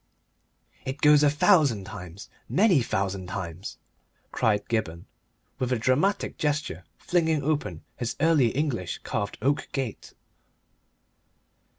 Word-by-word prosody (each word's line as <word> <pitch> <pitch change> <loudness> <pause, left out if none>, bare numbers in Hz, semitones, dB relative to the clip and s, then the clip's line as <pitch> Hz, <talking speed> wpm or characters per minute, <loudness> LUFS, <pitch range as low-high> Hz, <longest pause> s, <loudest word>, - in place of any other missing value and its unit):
"It 135 +2 -5
goes 150 0 +6
a 150 - +5
thousand 145 - +3
times, 95 +1 -9 0.2
many 185 - +4
thousand 95 -4 -2
times!" 90 0 -6 0.5
cried 105 -2 +1
Gibberne, 90 -8 -2 0.5
with 130 -1 -1
a 125 - +2
dramatic 145 - +1
gesture, 150 -1 -1
flinging 160 -4 +1
open 150 +1 -2
his 120 -2 -3
Early 155 -5 +4
English 125 - -2
carved 100 0 -3
oak 140 +2 +1
gate. 130 -6 -4
130 Hz, 110 wpm, -26 LUFS, 100-150 Hz, 0.5 s, goes